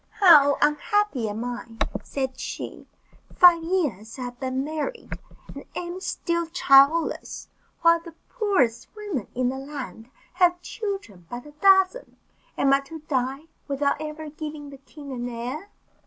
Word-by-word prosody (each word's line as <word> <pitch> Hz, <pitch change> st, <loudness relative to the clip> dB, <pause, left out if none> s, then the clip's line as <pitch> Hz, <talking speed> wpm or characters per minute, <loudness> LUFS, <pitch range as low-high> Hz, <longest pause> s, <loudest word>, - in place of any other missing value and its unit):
"How 295 Hz, -8 st, +7 dB
unhappy 300 Hz, -, +1 dB
am 220 Hz, +3 st, -4 dB
I," 240 Hz, -2 st, -6 dB, 0.2 s
said 265 Hz, -2 st, -4 dB
she; -, -, -6 dB, 0.5 s
"five 350 Hz, -2 st, +7 dB
years 280 Hz, -, -2 dB
I 255 Hz, -, -5 dB
have 245 Hz, 0 st, -7 dB
been 260 Hz, 0 st, -2 dB
married, 315 Hz, -, -5 dB, 0.4 s
and -, -, -9 dB
am 350 Hz, +1 st, -5 dB
still 340 Hz, -3 st, -2 dB
childless, 310 Hz, -1 st, +3 dB, 0.3 s
while 335 Hz, 0 st, +6 dB
the 335 Hz, -1 st, -13 dB
poorest 290 Hz, -, 0 dB
women 410 Hz, -, -4 dB
in 250 Hz, 0 st, +1 dB
the 265 Hz, +1 st, -4 dB
land 265 Hz, -6 st, -8 dB, 0.2 s
have 355 Hz, -1 st, +3 dB
children 390 Hz, -, -6 dB
by 240 Hz, -, -5 dB
the 295 Hz, -, -14 dB
dozen. 385 Hz, +8 st, +3 dB, 0.4 s
Am 275 Hz, 0 st, +3 dB
I 275 Hz, -, +5 dB
to 295 Hz, +3 st, -10 dB
die 270 Hz, -2 st, -1 dB, 0.3 s
without 280 Hz, +1 st, 0 dB
ever 305 Hz, 0 st, -6 dB
giving 300 Hz, -2 st, -7 dB
the 275 Hz, -, -10 dB
king 280 Hz, +1 st, -11 dB
an 245 Hz, -1 st, -4 dB
heir?" 250 Hz, +11 st, -5 dB
295 Hz, 145 wpm, -25 LUFS, 255-340 Hz, 0.5 s, How